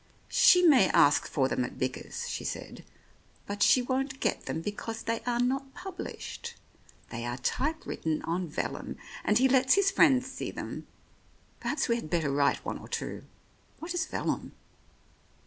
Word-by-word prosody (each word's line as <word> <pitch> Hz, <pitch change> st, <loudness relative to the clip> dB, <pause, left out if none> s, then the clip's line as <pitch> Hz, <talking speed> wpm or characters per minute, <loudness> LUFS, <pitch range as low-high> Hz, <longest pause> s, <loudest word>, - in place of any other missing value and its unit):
"She 360 Hz, 0 st, +6 dB
may 270 Hz, -, +6 dB
ask 145 Hz, 0 st, +4 dB
for 135 Hz, -3 st, +1 dB
them 130 Hz, -, 0 dB
at 125 Hz, -, -6 dB
Bickers," 130 Hz, 0 st, -3 dB
she -, -, -4 dB
Said, -, -, -6 dB, 0.6 s
"but 205 Hz, 0 st, -5 dB
she 255 Hz, -, +5 dB
won't 265 Hz, +1 st, -2 dB
get -, -, -1 dB
them -, -, -2 dB
because 220 Hz, +4 st, -5 dB
they 230 Hz, 0 st, -1 dB
are 240 Hz, -1 st, +1 dB
not 270 Hz, +2 st, -1 dB
published. 365 Hz, +1 st, -7 dB, 0.6 s
They 115 Hz, -1 st, -4 dB
are 120 Hz, +1 st, -3 dB
type 300 Hz, -, -1 dB
written 160 Hz, -1 st, -2 dB
on 175 Hz, +2 st, -2 dB
vellum, 150 Hz, -, -4 dB, 0.3 s
and 210 Hz, -, +3 dB
he 260 Hz, +2 st, +5 dB
lets 260 Hz, 0 st, +4 dB
his 395 Hz, -1 st, +3 dB
friends 265 Hz, -9 st, +5 dB
see 265 Hz, -, -5 dB
them. -, -, -6 dB, 0.7 s
Perhaps 285 Hz, -1 st, -1 dB
we 235 Hz, -1 st, +2 dB
had 155 Hz, -, -6 dB
better 160 Hz, -4 st, +1 dB
write 140 Hz, 0 st, +1 dB
one -, -, -3 dB
or -, -, -11 dB
two. -, -, -4 dB, 0.5 s
What 335 Hz, +2 st, -5 dB
is 355 Hz, -, -1 dB
vellum -, -, -3 dB
245 Hz, 165 wpm, -29 LUFS, -, 0.7 s, She